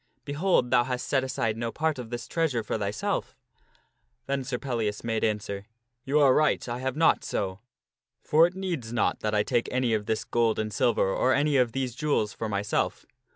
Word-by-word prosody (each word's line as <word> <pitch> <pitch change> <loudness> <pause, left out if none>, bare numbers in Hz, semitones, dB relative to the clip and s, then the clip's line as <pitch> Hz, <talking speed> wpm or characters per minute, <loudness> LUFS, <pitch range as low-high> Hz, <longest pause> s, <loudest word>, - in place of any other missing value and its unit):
Behold, 145 -4 +1
thou 120 -1 +5
hast 125 -1 -3
set 135 -2 +2
aside 115 -4 -1
no 115 0 -2
part 155 -1 -1
of 120 -2 -7
this 120 0 -5
treasure 150 -9 0
for - - -3
thyself." 105 -1 -2 0.9
Then 135 0 -1
Sir 125 -1 -3
Pellias 115 -6 -2
made 115 -1 -1
answer: 105 -2 -2 0.2
" 120 0 -52
You 140 +2 +2
are 140 -3 +6
right, 150 -2 +2
I 120 0 -3
have 130 0 -2
not 160 +1 +3
so. 95 -1 -3 0.6
For 160 +3 +5
it 175 - -10
needs 170 -12 -3
not 120 - +1
that 105 0 -1
I 105 - +3
take 120 +1 0
any 125 -2 +1
of 105 -1 -1
this 110 - 0
gold 115 -2 +1
and 110 -1 -2
silver, 115 -2 +2
or 130 +6 +2
any 145 +1 +2
of 125 -4 +3
these 130 -2 -2
jewels, 130 -6 0
for 110 - -4
myself. 100 0 -1
120 Hz, 200 wpm, -27 LUFS, 110-140 Hz, 0.9 s, are